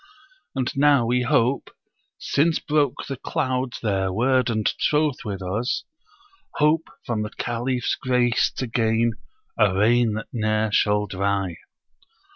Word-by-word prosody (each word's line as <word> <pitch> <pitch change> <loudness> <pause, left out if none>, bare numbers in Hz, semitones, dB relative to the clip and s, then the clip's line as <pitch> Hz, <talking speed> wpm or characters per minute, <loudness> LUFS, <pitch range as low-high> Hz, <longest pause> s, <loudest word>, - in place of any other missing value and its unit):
And 130 -1 -2
now 140 -3 +4
we 125 +2 +1
hope 125 +2 +1 0.5
since 160 +3 +1
broke 145 -3 0
the 135 - -4
clouds 130 -1 -2
their 95 -3 0
word 130 +5 +2
and 110 -2 -1
troth 150 -3 +1
with 100 -4 -5
us 105 +8 -2 0.7
Hope 150 +2 +2 0.2
from 115 -4 -1
the 105 - -3
Caliph's 120 +2 -2
grace 125 -2 +2
to 130 - -2
gain 115 0 +1 0.5
a 100 -4 +4
rain 115 +2 +3
that 110 +1 -5
ne'er 110 -1 0
shall 105 0 +2
dry.' 100 -2 -1
120 Hz, 130 wpm, -23 LUFS, 105-130 Hz, 0.7 s, now